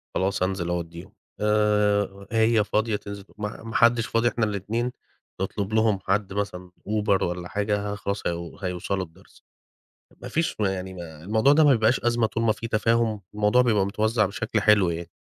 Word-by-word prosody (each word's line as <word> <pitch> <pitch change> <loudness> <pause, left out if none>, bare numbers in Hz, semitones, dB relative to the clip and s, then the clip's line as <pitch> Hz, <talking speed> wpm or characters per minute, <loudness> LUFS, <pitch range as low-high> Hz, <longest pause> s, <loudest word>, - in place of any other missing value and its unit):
خلاص 95 0 0
أنزل 95 -2 -1
أوديهم 85 +3 -5 0.3
آآ، 105 -1 +1
هي 110 -1 +3
فاضية 110 +1 0
تنزل 100 -1 -7
تو - - -24
ما 105 +1 -5
ما 115 0 -8
حدش 115 -1 +4
فاضي 115 +1 +1
إحنا 115 -1 0
الاتنين 110 +4 -2 0.5
نطلب 100 +2 -3
لهم 110 -2 +3
حد 100 0 0
مثلًا 90 -3 -4 0.2
أوبر 105 -2 +1
والَّا 90 0 -3
حاجة 105 +1 -1
خلاص 100 0 -3
هي 85 -1 -4
هيوصلوا 95 +1 -2
الدرس، 90 +4 -22 0.8
ما - - -6
فيش 165 +1 -1
يعني 95 -2 -2 0.3
الموضوع 110 +8 +3
ده 155 +1 +5
ما 145 - +6
بيبقاش 115 0 +3
أزمة 120 -1 +1
طول 115 +1 -2
ما 115 - +4
في 110 +2 -4
تفاهم، 115 -1 +1
الموضوع 105 +4 +3
بيبقى 110 -6 +2
متوزع 110 +2 +1
بشكل 105 +2 -2
حلو 105 -4 +4
يعني. 85 0 -4
105 Hz, 170 wpm, -25 LUFS, 95-110 Hz, 0.8 s, ما